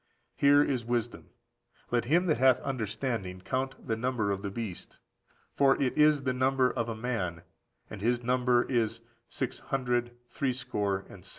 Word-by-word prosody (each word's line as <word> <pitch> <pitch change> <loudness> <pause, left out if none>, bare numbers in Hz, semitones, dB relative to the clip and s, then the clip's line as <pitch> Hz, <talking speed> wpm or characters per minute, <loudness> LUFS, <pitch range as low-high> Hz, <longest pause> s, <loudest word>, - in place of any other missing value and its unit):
Here 145 +1 +5
is 130 -5 -1
wisdom. 120 0 -3 0.6
Let 120 -1 +1
him 170 +8 +3
that 155 -4 +1
hath 130 -1 +5
understanding 110 -6 -3
count 130 +7 -3
the 110 - 0
number 115 -3 -1
of 100 0 -2
the 100 - -3
beast; 100 -3 -7 0.6
for 135 -1 +4
if 130 -2 0
is 150 -2 +4
the 130 -1 0
number 130 0 +2
of 115 0 -2
a 115 - -3
man, 110 -8 -3 0.4
and 105 - -9
his 120 +2 +1
number 125 0 +3
is 115 -2 -1 0.3
six 130 -2 -3
hundred 120 -2 -1
threescore 120 -7 -2
and 90 - -13
six." 95 - -9
120 Hz, 165 wpm, -29 LUFS, 110-130 Hz, 0.6 s, Here